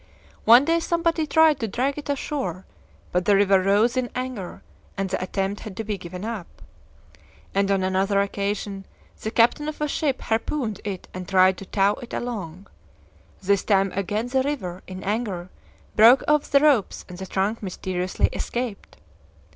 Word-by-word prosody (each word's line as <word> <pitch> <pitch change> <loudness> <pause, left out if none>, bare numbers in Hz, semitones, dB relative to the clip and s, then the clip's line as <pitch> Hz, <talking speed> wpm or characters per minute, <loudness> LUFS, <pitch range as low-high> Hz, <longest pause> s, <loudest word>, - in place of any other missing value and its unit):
One 240 +5 +8
day 330 +1 +2
somebody 335 -1 0
tried 320 -2 +4
to 225 - -2
drag 255 +7 -1
it 295 -1 -8
ashore, 265 - -3 0.5
but 180 0 0
the 205 - +5
river 195 -1 +4
rose 205 +6 +3
in 255 -1 -1
anger, 255 -7 -5 0.3
and 195 0 -1
the - - -1
attempt 195 +2 -2
had 205 -4 -9
to 225 - -2
be 215 -1 -2
given 180 +3 -7
up. 220 -6 -5 1.1
And 195 0 +1
on 195 -1 +2
another 190 +2 +1
occasion 200 0 -2 0.3
the 220 - -2
captain 240 +7 +3
of 305 - -7
a 300 - 0
ship 285 -2 -1
harpooned 225 0 -2
it 195 -3 -5
and 185 -1 -7
tried 185 -1 +4
to 195 - -10
tow 200 +1 +1
it 245 - -7
along. 195 -7 -5 0.8
This 200 +1 +2
time 195 -2 +2
again 205 +4 -2
the 265 +1 +2
river, 195 -11 -3
in 185 0 -8
anger, 195 -4 -3 0.4
broke 235 +5 +7
off 300 -1 +2
the 280 -1 +5
ropes, 280 -10 +2
and 180 0 -10
the 190 - -6
trunk 200 +5 -1
mysteriously 185 -1 -1
escaped." 240 -4 -4
205 Hz, 170 wpm, -24 LUFS, 190-255 Hz, 1.1 s, One